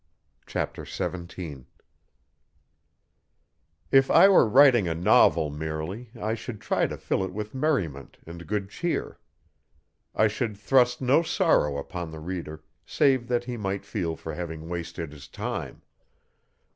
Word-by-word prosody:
Chapter - - -3
17 85 -6 -6 2.2
If 135 0 +5
I - - +7
were 180 - +5
writing 125 -5 +6
a 80 - -1
novel 80 -2 +4
merely 80 +9 -5
I 110 +1 -1
should 115 -1 -6
try - - 0
to - - -6
fill 95 - -1
it 95 - -4
with 105 +2 -6
merriment 115 - -2
and 85 0 -10
good 100 -2 -2
cheer. 175 -1 -3 1.0
I 110 - +4
should 110 0 -3
thrust 125 +3 +3
no 130 +6 +4
sorrow 160 - +2
upon 85 +3 -5
the 80 0 -9
reader 80 -2 -6 0.2
save 130 -5 +2
that 120 -1 0
he 120 -1 -5
might 100 -2 -3
feel 85 -6 -3
for 80 0 -7
having 80 -1 -6
wasted 85 -2 -5
his 75 -2 -12
time. - - -5
95 Hz, 135 wpm, -26 LUFS, 80-120 Hz, 2.2 s, I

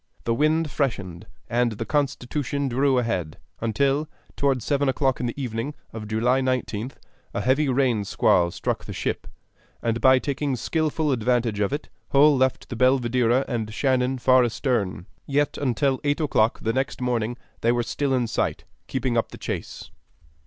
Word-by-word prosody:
The 115 - +1
wind 155 +4 +1
freshened, 100 - -2 0.2
and 120 -1 +1
the 105 - -5
Constitution 140 -1 -1
drew 135 +1 +2
ahead, 95 -10 -1 0.2
until, 135 +7 +1 0.3
toward 135 -4 +1
seven 140 -1 +1
o'clock 130 0 +1
in 125 - -1
the 120 - -5
evening 125 +3 -3 0.2
of 110 -1 -6
July 120 +5 +2
19th, 130 -2 -2 0.4
a - - 0
heavy 135 +3 +2
rain 125 -5 +2
squall 90 -2 +3
struck - - -3
the - - -6
ship, - - -3 0.5
and 115 0 -1
by 130 0 +6
taking 140 0 -1
skillful 155 +4 0
advantage 120 -3 +1
of 100 +2 +1
it 145 +2 -4 0.2
Hull 145 +1 +6
left 130 0 0
the 125 - -4
Belvidera 125 0 +3
and 115 -4 -3
Shannon 130 +2 +1
far 130 0 +5
astern; 115 -7 -1 0.2
yet 145 +1 +1
until 135 0 +1
eight 145 +1 +1
o'clock 120 -7 +1
the 115 - 0
next 135 +1 -1
morning 120 -2 -1 0.2
they 115 - +2
were 120 0 +1
still 140 +3 -2
in 125 -2 +1
sight, 115 - -1 0.2
keeping 130 -2 -1
up 115 - +1
the - - -10
chase. - - -6
130 Hz, 165 wpm, -24 LUFS, 115-140 Hz, 0.5 s, by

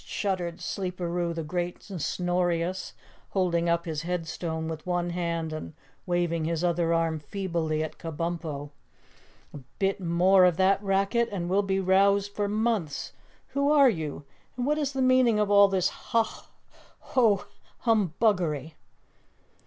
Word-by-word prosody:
shuddered 180 -4 -2
Sleeperoo 175 -2 -3
the 165 -1 -4
Great 175 +2 -4
and 185 - -5
Snorious, 175 +1 -1 0.4
holding 170 -3 +1
up 170 0 +1
his 155 -3 -3
headstone 165 -1 -3
with 160 -1 -5
one 175 -1 0
hand 170 -2 -2
and 155 0 -7 0.3
waving 175 -2 0
his 165 +1 -1
other 170 -1 +1
arm 165 -1 +1
feebly 160 -2 -2
at 155 0 -7
Kabumpo. 160 -3 -4 0.8
"A - - -7 0.2
bit 195 +1 0
more 185 +2 +4
of 175 -2 +3
that 195 +1 +3
racket 200 +4 +1
and 180 -4 -3
we'll 200 +2 +4
be 195 -1 0
roused 200 +2 +3
for 205 0 -1
months. 210 -8 -1 0.4
Who 280 +1 +1
are 280 -4 +6
you? 155 -6 -5 0.3
And 245 - -1
what 300 +2 +1
is 285 -2 -1
the 265 -1 0
meaning 255 -4 +4
of 210 -1 +1
all 200 0 +7
this 190 -2 +1
Hah 230 -2 -2 0.5
Hoh 220 -6 +2 0.4
Humbuggery?" 180 - +1
180 Hz, 145 wpm, -27 LUFS, 165-200 Hz, 0.8 s, all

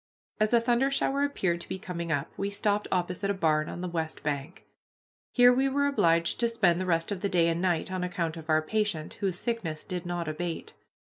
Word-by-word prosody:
As 215 0 +2
a 235 - +6
thunder 240 +3 +2
shower 275 0 +1
appeared 190 -12 0
to - - -10
be - - -3
coming 170 -2 -5
up 145 0 -1
we 200 +1 -2
stopped 205 0 0
opposite 180 +2 -1
a 200 - +1
barn 155 -4 +1
on 175 - -6
the 180 - -2
west 160 -2 -3
bank. 145 +3 -4 0.7
Here 245 -1 +6
we 265 +2 +2
were 285 +1 +1
obliged 170 -12 +2
to 235 -1 +2
spend 185 -6 +2
the 185 - -3
rest 165 +1 +1
of 195 -3 -3
the 200 - 0
day 175 -3 +3
and 165 +1 0
night, 180 -1 0
on 185 -1 -2
account 175 -3 -2
of 160 -1 -10
our 155 0 +3
patient, 210 -4 -1
whose 190 -4 -1
sickness 190 -9 -3
did 180 -2 -5
not 175 -2 -3
abate. 165 +2 -4
180 Hz, 220 wpm, -28 LUFS, 165-210 Hz, 0.7 s, a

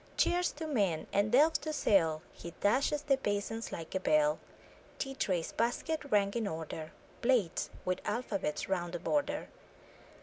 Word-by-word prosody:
Chairs 355 0 +3
to 320 +2 -6
mend, 200 - +1
and 205 +2 +2
delf 300 +6 +5
to 310 - -3
sell! 165 - +2
He 170 - -9
clashes 275 +7 +2
the 275 -2 +3
basins 225 -1 -2
like 165 -1 -6
a 190 - +1
bell; 300 +7 +3 0.6
Tea 270 -1 -3
trays, 185 -10 -1
baskets 285 +6 -1
ranged 200 0 +3
in 230 -3 0
order, 160 -2 -5 0.3
Plates, 235 -9 +2 0.2
with 185 0 0
alphabets 205 -7 -2
round 175 -2 -1
the 175 - -2
border! 290 - 0
210 Hz, 155 wpm, -32 LUFS, 180-280 Hz, 0.6 s, delf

